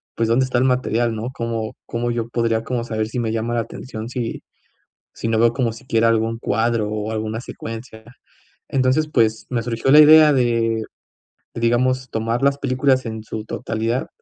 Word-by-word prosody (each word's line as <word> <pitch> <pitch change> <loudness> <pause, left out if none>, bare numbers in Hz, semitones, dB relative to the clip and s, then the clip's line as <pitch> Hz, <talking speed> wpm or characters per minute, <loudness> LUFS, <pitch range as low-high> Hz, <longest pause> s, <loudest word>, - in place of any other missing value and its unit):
pues, 115 - 0
¿dónde 125 +3 +3
está 125 -1 0
el - - +2
material, 120 -2 +1
no? 110 +3 -4
¿Cómo 115 -3 -3
cómo 120 +1 -2
yo 115 -1 -3
podría 115 -1 0
como 120 0 -2
saber 110 -2 -2
si 120 +3 -4
me 115 -2 -1
llama 115 +1 -2
la 115 - +1
atención 115 0 -7
si 120 -2 -4 0.7
si 115 - -4
no 115 - +1
veo 115 +1 +4
como 120 -2 -1
siquiera 115 -1 0
algún 115 0 +1
cuadro, 115 0 0
o 105 0 -3
alguna 110 +1 -3
secuencia?". 115 -2 -8 0.6
Entonces, 135 +4 +1
pues, 110 -3 +1
me 120 -2 -1
surgió 120 +2 -1
la 150 - +9
idea 155 0 +8
de, 115 -4 +1 0.7
digamos, 125 +2 +1
tomar 115 +3 -2
las 140 0 +2
películas 130 -1 +1
en 110 -1 -5
su 110 0 -6
totalidad 115 +3 -2
115 Hz, 175 wpm, -21 LUFS, 110-125 Hz, 0.7 s, la